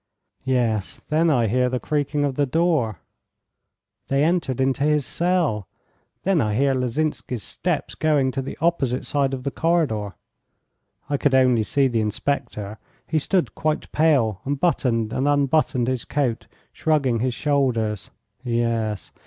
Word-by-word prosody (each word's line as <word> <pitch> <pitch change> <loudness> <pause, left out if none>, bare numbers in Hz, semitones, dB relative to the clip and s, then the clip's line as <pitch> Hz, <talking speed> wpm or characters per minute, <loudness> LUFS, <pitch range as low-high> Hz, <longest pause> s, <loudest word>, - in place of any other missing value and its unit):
Yes. 120 -6 0
Then 160 +2 +3
I 125 -6 +3
hear 125 +4 +2
the 125 0 -1
creaking 145 0 -1
of 140 - -1
the 145 +1 0
door; 155 - +1 1.1
they 135 +1 +2
entered 160 -6 0
into 135 +1 +1
his 150 -2 +2
cell. 165 - 0 0.6
Then 190 -5 +2
I 105 -3 0
hear 135 +3 +2
Lozinsky's 130 -2 -2
steps - - -3
going 145 -4 +1
to 135 - -2
the 135 - -7
opposite 145 -7 0
side 140 -2 0
of 130 -2 -4
the 140 - -2
corridor. 140 - 0 0.9
I 145 0 0
could 140 -1 +2
only 130 -3 +4
see 135 +6 +2
the 115 -3 0
inspector. 105 -2 -3 0.3
He 160 - 0
stood 180 +4 0
quite 155 -1 -2
pale, 130 - +2
and 140 0 -2
buttoned 115 -10 +1
and 135 +2 0
unbuttoned 145 -3 +2
his 130 -2 -1
coat, 135 -6 -1 0.3
shrugging 140 -7 +1
his 125 0 -1
shoulders. 120 -8 0 0.3
Yes. 115 - -1
135 Hz, 145 wpm, -23 LUFS, 115-150 Hz, 1.1 s, only